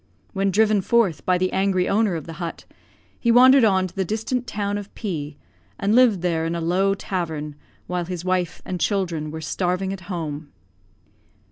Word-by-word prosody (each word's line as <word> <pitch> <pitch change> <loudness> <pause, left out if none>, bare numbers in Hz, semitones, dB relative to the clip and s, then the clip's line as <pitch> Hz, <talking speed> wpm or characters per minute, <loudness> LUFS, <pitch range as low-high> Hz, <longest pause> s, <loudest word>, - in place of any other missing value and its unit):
When 195 -1 +1
driven 210 +1 +3
forth 205 -4 +1
by 180 -1 +4
the 185 +1 -1
angry 190 -1 +1
owner 205 -3 +2
of 160 - -5
the 165 - -8
hut, 170 -1 -5 0.5
he 235 - +2
wandered 255 +2 +7
on 190 -4 +3
to 185 - -9
the 195 - 0
distant 225 +6 -2
town 205 0 -2
of 205 -1 -10
P, 155 -9 -4 0.4
and 200 +2 +1
lived 235 -6 +5
there 165 -2 0
in 165 +1 -2
a - - -2
low 185 +4 +1
tavern, 160 -6 -4 0.3
while 180 -1 -2
his 180 0 -6
wife 180 -2 -1
and 180 - -4
children 170 -4 -1
were 160 +1 -6
starving 180 +4 -1
at 195 - -8
home. 155 -4 -5
185 Hz, 180 wpm, -23 LUFS, 170-205 Hz, 0.5 s, wandered